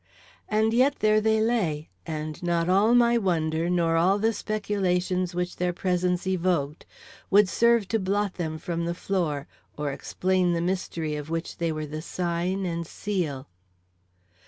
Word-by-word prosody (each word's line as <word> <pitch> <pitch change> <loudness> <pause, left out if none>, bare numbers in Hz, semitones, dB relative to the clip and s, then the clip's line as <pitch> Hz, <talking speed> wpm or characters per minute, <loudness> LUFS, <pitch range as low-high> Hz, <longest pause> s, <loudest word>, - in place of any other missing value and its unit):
And 220 +1 +2
yet, 265 +4 +4
there 215 -2 +3
they 220 0 +2
lay; 185 -10 0 0.2
and 155 -1 -5
not 170 -1 0
all 200 +6 +4
my 235 -1 +4
wonder, 165 -4 0
nor 170 -2 +2
all 185 +4 +3
the 225 +2 +1
speculations 185 -4 -1
which 180 0 -2
their 180 0 0
presence 180 0 0
evoked, 175 -5 -1 0.4
would 205 0 +6
serve 235 +3 +3
to 225 - +1
blot 200 0 0
them 160 -3 -3
from 170 +1 -3
the 170 0 -2
floor 165 -7 -1 0.3
or 150 -1 -2
explain 185 +4 0
the 170 - 0
mystery 170 -3 -2
of 150 0 -6
which 165 0 -4
they 170 -1 0
were 155 -1 -3
the 155 +1 -6
sign 180 +3 -2
and 170 -2 -3
seal. 165 -12 -3
180 Hz, 160 wpm, -26 LUFS, 165-200 Hz, 0.4 s, would